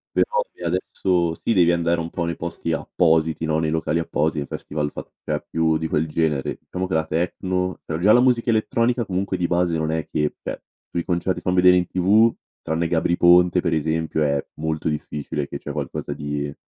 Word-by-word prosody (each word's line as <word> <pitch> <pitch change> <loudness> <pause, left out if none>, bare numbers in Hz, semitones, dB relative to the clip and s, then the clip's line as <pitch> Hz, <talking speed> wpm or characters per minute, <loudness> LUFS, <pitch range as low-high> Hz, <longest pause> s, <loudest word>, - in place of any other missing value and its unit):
però 485 0 +2
se - - -18
adesso 85 -3 0
sì, 115 - -1
devi 85 -4 +4
andare 85 0 +1
un 80 - -5
po' 85 0 -3
nei 85 -1 -2
posti 85 0 -3
appositi 80 -1 +1
no, 80 0 +1
nei 80 -1 0
locali 80 0 0
appositi, 75 -2 -1
festival 75 +1 -4
fat - - -8
cioè, - - -3
più 80 -1 +2
di 80 0 -3
quel 80 +1 0
genere. 75 -3 -1
Diciamo 95 0 -2
che 95 - -4
la 80 0 +1
techno 90 +3 -2
però 80 - -3
già 100 +4 +4
la 120 - +7
musica 125 -2 +3
elettronica 115 +2 +1
comunque 95 0 -2
di 90 - 0
base 85 -1 +1
non 80 0 -1
è 80 0 -1
che 75 -1 -1
cioè, - - -5 0.3
sui 85 - -2
concerti 90 0 -1
fan 90 - -1
vedere 90 0 +6
in 90 -1 0
TV, 105 +5 +4 0.3
tranne 80 +1 -1
Gabry 85 +1 +1
Ponte 90 +1 +5
per 85 -2 0
esempio, 80 0 -1
è 70 -2 +1
molto 80 0 -2
difficile 75 -1 -4
che - - -6
c'è 75 - -6
qualcosa 70 0 -4
di 75 0 -4
85 Hz, 200 wpm, -22 LUFS, 80-90 Hz, 0.3 s, la